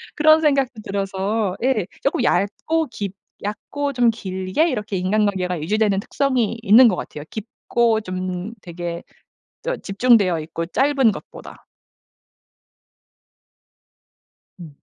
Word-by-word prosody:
그런 310 +1 +5
생각도 275 -6 +1
들어서 195 0 -2
예. 230 -9 +1 0.2
쪼끔 275 - +1
얇고 310 +10 +1
깊 200 -2 -4 0.3
얕고 280 +8 -3
좀 240 -2 +4
길게 190 - -1
이렇게 210 -5 -3
인간관계가 185 -2 0
유지되는 205 +4 +1
특성이 250 -1 0
있는 230 +4 +7
것 215 - +3
같아요. 150 -4 -7
깊고 225 +1 0
좀 185 +2 -4
되게 170 -1 -6 0.6
또 - - -2
집중되어 200 -5 +3
있고 165 +2 -5
짧은 270 +1 +3
것보다. - - -11 2.9
음. 155 -5 -11
210 Hz, 235 characters per minute, -21 LUFS, 185-250 Hz, 2.9 s, 있는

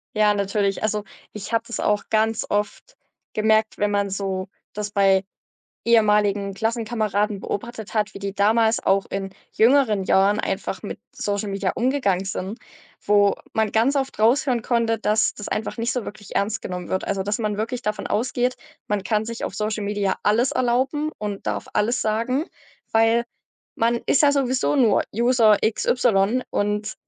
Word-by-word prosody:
Ja, 210 -1 +4
natürlich. 200 0 -1
Also, 210 -1 0 0.3
ich 210 +2 -8
habe 225 0 +2
das 235 - -5
auch 210 0 +1
ganz 220 0 +1
oft 210 - -3 0.4
gemerkt, 220 0 +2
wenn 205 0 +1
man 200 -1 0
so 190 -1 -3 0.2
das 210 0 -4
bei 195 -2 +3 0.6
ehemaligen 210 -3 +3
Klassenkameraden 215 -2 -1
beobachtet 220 +1 -5
hat, 210 -1 0
wie - - -8
die 200 0 -4
damals 220 +3 +3
auch 195 0 +2
in 195 0 -4 0.2
jüngeren 225 -4 +3
Jahren 195 +3 +3
einfach - - -3
mit - - -6
Social 205 0 -2
Media 195 -1 -1
umgegangen 240 -7 +1
sind, 195 +3 -5 0.4
wo 205 -1 +4 0.2
man 220 -2 +1
ganz 235 +6 +2
oft 270 -1 -1
raushören 240 +2 +3
konnte, 230 -2 0
dass 215 0 +2
das 205 - -8
einfach 220 - -3
nicht 230 +1 -1
so 245 -2 -3
wirklich 205 -2 -10
ernst 215 +2 0
genommen 180 -1 -5
wird. 190 - -2
Also 195 -1 -1
dass 205 +3 -2
man 210 -2 -1
wirklich 235 +3 -3
davon 210 -2 -3
ausgeht, 245 +2 0 0.3
man 205 -2 -1
kann 215 +2 0
sich 230 +1 -6
auf - - -4
Social 215 0 -2
Media 200 -1 -1
alles 230 +5 +2
erlauben 260 +5 0
und 205 -2 -5
darf - - -3
alles 235 +4 +1
sagen, 230 +7 0 0.5
weil 225 +1 +3 0.5
man 230 +1 +2
ist - - +3
ja 290 -1 +5
sowieso 265 0 +1
nur 235 -8 +4
User 235 -2 +4
x 220 0 0
y 240 0 +2
und 210 +1 -1
215 Hz, 165 wpm, -23 LUFS, 200-235 Hz, 0.6 s, ja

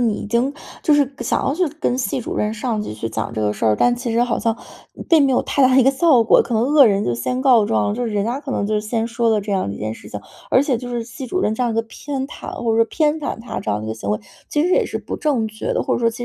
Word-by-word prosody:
你 220 - +1
已 - - -5
经 240 +6 0 0.3
就 305 - +4
是 285 -2 +2
想 - - 0
要 275 - 0
去 360 0 +1
跟 250 -4 0
系 240 -3 -1
主 240 - -5
任、 210 +1 -1
上 225 -1 -2
级 210 - -5
去 115 +1 -5
讲 110 0 -3
这 110 - -2
个 105 0 +1
事 110 - -2
儿， 105 -1 +3
但 245 - +3
其 245 0 -4
实 230 +1 +2
好 245 -1 0
像 225 +1 0 0.5
并 315 -5 +5
没 265 - +2
有 250 - +2
太 280 - 0
大 255 0 +5
的 - - +6
一 260 - +5
个 270 - +6
效 270 -4 +4
果。 - - +5
可 240 - -4
能 220 - +2
恶 280 -1 +6
人 200 -1 +2
就 120 - 0
先 250 - -2
告 245 -6 +5
状， 110 - +1
就 245 +1 -2
是 - - -3
人 205 0 +1
家 245 +4 -2
可 285 -2 -7
能 200 - -1
就 215 - -2
是 210 - +1
先 225 +1 -2
说 235 0 0
了 220 -1 +3
这 205 0 -4
样 190 - 0
一 100 - -6
件 110 +1 -3
事 - - -12
情。 105 - -6 0.3
而 260 - +5
且 265 -5 0
就 245 +1 -7
是 240 -1 -3
系 250 +3 -8
主 370 +9 -1
任 215 - +1
这 250 - -2
样 235 - 0
一 - - -4
个 225 - +1
偏 270 +4 -5
袒， - - -9
或 230 - +2
者 - - +1
说 230 - -1
偏 310 +2 0
袒 290 - -4
他 230 +2 -6
这 - - -3
样 105 - 0
的 - - -6
一 - - -5
个 - - -3
行 110 -3 -7
为， 105 +1 +1 0.3
其 295 - +1
实 360 - +1
也 - - +3
是 - - -4
不 - - -6
正 275 -8 0
确 215 -1 -4
的， - - 0
或 - - 0
者 - - -2
说 230 - +3
其 240 +1 -5
235 Hz, 360 characters per minute, -20 LUFS, 210-265 Hz, 0.5 s, 的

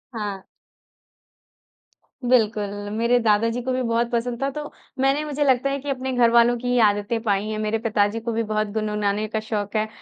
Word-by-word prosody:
हाँ। 200 -3 -4 1.8
बिल्कुल, 215 -4 +2 0.3
मेरे 235 +2 +3
दादाजी 230 +2 +2
को 255 +2 -2
भी 255 - 0
बहुत 235 0 0
पसंद 235 +1 -2
था 275 - +1
तो 295 +1 -6 0.3
मैंने 270 +3 +2
मुझे 290 -1 -1
लगता 265 0 +2
है 275 0 -2
कि 285 +1 -7
अपने 265 -1 -2
घरवालों 235 0 +4
की 245 +1 -6
ही 245 0 +2
आदतें 205 +3 -1
पाई 200 -1 +1
हैं। 215 0 -3
मेरे 215 +1 0
पिताजी 215 -1 +1
को 230 +1 -4
भी 230 +1 0
बहुत 215 0 -1
गुनगुनाने 210 -1 -1
का 220 0 -2
शौक 215 -1 -4
है, 215 0 +1
230 Hz, 185 wpm, -23 LUFS, 215-245 Hz, 1.8 s, घरवालों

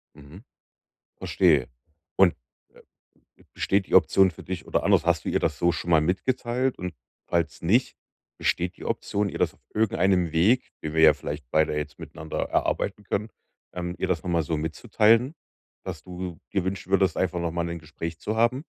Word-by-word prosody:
Mhm. 75 +8 -14 0.7
Verstehe. - - +2 0.5
Und 95 -3 +5 1.0
b - - -22
besteht 95 0 +1
die - - -3
Option 95 0 +5
für 80 - -12
dich 90 -2 -6
oder - - 0
anders, - - +4
hast 85 -2 +1
du - - -3
ihr - - +1
das - - -1
so 85 0 +3
schon 85 0 -4
mal 80 -2 +6
mitgeteilt? 120 +9 -1
Und 90 -1 -5 0.3
falls 85 -2 -1
nicht, 110 +10 +2 0.4
besteht 90 +1 -1
die - - -10
Option, 100 0 -1
ihr - - -6
das - - +1
auf - - -29
irgendeinem 95 -5 +2
Weg, 105 +10 +3
den 75 0 -4
wir 80 - +3
ja 80 -1 +8
vielleicht 75 0 -6
beide 80 -1 +2
jetzt 75 0 -4
miteinander 80 0 -7
erarbeiten 105 +1 -1
können, 105 +2 -2 0.4
ähm, 90 0 -4
ihr - - -1
das 85 -3 0
nochmal 85 -2 0
so 80 +1 -2
mitzuteilen, 110 - +2 0.5
dass - - -6
du 90 -2 -7
dir 95 -3 0
wünschen 95 0 -4
würdest, 95 -3 +3
einfach 90 -1 0
noch 85 -1 -1
mal 85 0 -1
'nen 85 0 -4
Gespräch 80 +1 -7
zu 110 +5 -3
haben? 120 +5 +2
90 Hz, 180 wpm, -26 LUFS, 80-100 Hz, 1.0 s, ja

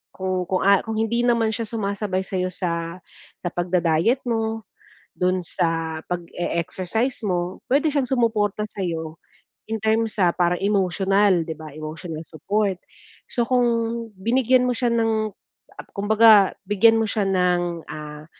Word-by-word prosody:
kung 185 -1 -1
kung, 185 - 0
ah, 200 0 +6
kung 225 -1 -4
hindi 235 +2 +1
naman 230 -2 +2
siya 230 -1 -3
sumasabay 200 -3 -2
sa 190 0 -4 1.0
sa 175 - -3
pagda-diet 175 +6 +1
mo. 225 -1 -1 0.5
Dun 185 0 +1
sa 165 -2 -1
pag-e-exercise 180 +7 -2
mo, 180 0 -2
pwede 290 +3 +2
siyang 275 -4 0
sumuporta 215 -5 +1
sa'yo 165 -5 -4 0.5
in 225 - -1
terms 220 0 0
sa 175 -2 +4
parang 175 0 +1
emosyonal 195 -1 +2
'di 160 - -4
ba, 155 -1 -10
emotional 155 +1 -6
support. 195 +5 -1 0.6
So, 240 - +1
kung 250 -1 +3 0.6
binigyan 250 +3 +3
mo 250 - +1
siya 240 -1 0
ng 220 -2 +1 0.5
ap - - -9
kumbaga 210 -1 +5
bigyan 225 +2 +5
mo 220 - +1
siya 210 0 0
ng, 175 -3 0
ah, 150 0 -8
200 Hz, 135 wpm, -23 LUFS, 175-225 Hz, 1.0 s, ah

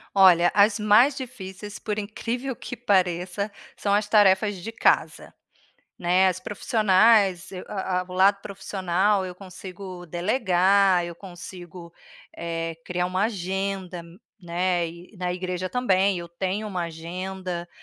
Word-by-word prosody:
Olha, 175 -3 +6
as 205 +2 +4
mais 220 +7 +4
difíceis, 210 -5 -8
por 210 -1 -3
incrível 235 +5 -4
que 245 - -8
pareça, 185 -1 0 0.2
são 200 - -2
as 210 0 0
tarefas 205 -1 +4
de 200 +6 -7
casa, - - +1 0.7
né, 180 +2 +3
as 185 0 -2
profissionais, 200 -2 +3
eu 180 - -6
a 190 -2 -2
a - - -5
o - - -9
lado 200 +2 +4
profissional, 190 0 0
eu 180 - -7
consigo 185 -1 -9
delegar, 185 0 +3
eu 170 0 -6
consigo 175 -1 -11 0.4
eh, 165 -1 -4
criar 180 0 -1
uma 185 +3 0
agenda, 190 -3 -3 0.4
né. 175 -1 0
E 170 +5 -13
na 180 -1 -2
igreja 180 0 -3
também, 195 -5 +2
eu 170 - -6
tenho 190 +5 -3
uma 180 -4 -3
agenda, 175 +2 -5
190 Hz, 135 wpm, -25 LUFS, 180-205 Hz, 0.7 s, Olha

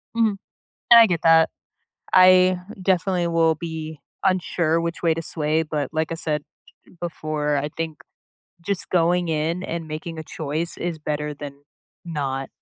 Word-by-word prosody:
Mhm, 225 -3 +2 0.6
and 235 -1 +11
I 230 - +8
get 175 -5 -1
that 165 0 +5 0.6
I 185 0 +6 0.2
definitely 185 -1 +1
will 165 -1 +3
be 160 -1 -6 0.2
unsure 175 -3 +1
which 170 0 -3
way 165 -2 +3
to 165 - -4
sway, 155 0 -1
but 150 -3 -3
like 160 0 -1
I - - -1
said 150 -3 -2 0.6
before, 155 -3 -2
I 145 +1 -2
think 160 -2 -4 0.6
just 185 +2 -3
going 175 0 +2
in 160 +3 -1
and 165 -3 -5
making 160 +2 -6
a - - -4
choice 155 +2 -4
is 170 -2 -3
better 150 0 -3
than 140 -1 -9 0.4
not. 135 -5 -3
165 Hz, 150 wpm, -23 LUFS, 155-175 Hz, 0.6 s, and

